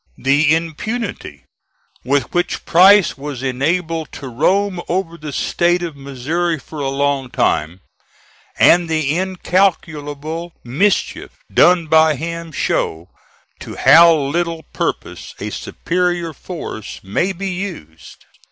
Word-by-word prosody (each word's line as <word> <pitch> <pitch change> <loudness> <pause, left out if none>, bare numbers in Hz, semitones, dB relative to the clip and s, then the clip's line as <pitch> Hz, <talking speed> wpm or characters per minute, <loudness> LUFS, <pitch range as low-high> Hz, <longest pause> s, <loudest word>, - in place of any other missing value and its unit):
The 145 +4 +3
impunity 165 - -5 0.6
with 135 0 0
which 175 0 -1
Price 190 -2 +5
was 140 -2 -6
enabled 160 +5 -1
to 135 - -7
roam 185 +9 +1
over 175 -1 -1
the 150 -2 -7
State 175 +5 0
of 165 -4 -5
Missouri 140 +5 -2
for 150 +2 -10
a 140 -1 -1
long 140 -1 -1
time, 85 -4 0 0.8
and 175 -1 +5
the 155 -2 0
incalculable 170 -4 -1
mischief 175 +12 -1 0.2
done 175 -2 +5
by 160 0 +4
him, 165 +2 -5
show 85 - -2 0.5
to - - -8
how 170 +1 +7
little 165 +3 -2
purpose - - -4
a - - -5
superior 175 -1 -2
force 155 - -7
may 105 - -1
be 195 +1 -4
used. 175 - -8
160 Hz, 115 wpm, -18 LUFS, 140-175 Hz, 0.8 s, how